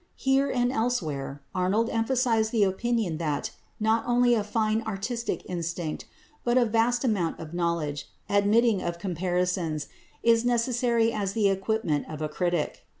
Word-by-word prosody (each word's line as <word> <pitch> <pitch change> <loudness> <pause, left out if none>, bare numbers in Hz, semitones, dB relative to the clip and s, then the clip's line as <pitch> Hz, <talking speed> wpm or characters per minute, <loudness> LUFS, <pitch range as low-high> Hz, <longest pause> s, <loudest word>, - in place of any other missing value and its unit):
Here 270 +1 +2
and 245 -1 +1
elsewhere 155 - -2
Arnold 190 +5 +1
emphasised 225 -1 +1
the 225 -3 +3
opinion 200 -3 0
that 150 -4 -2 0.3
not 220 +1 +2
only 245 0 +4
a 220 -3 +2
fine 215 +1 0
artistic 220 +2 -3
instinct 170 -2 -4 0.4
but 240 +1 +2
a 245 - +5
vast 230 +2 +2
amount 200 -10 0
of 160 0 -8
knowledge, 170 -5 -2 0.2
admitting 205 +1 +3
of 170 0 -3
comparisons, 180 -3 -1 0.3
is 230 0 +4
necessary 235 -1 +2
as 200 -2 -2
the 210 -2 +3
equipment 195 -6 -1
of 155 - -6
a 155 -1 -2
critic. 175 -1 -1
210 Hz, 145 wpm, -27 LUFS, 175-235 Hz, 0.4 s, a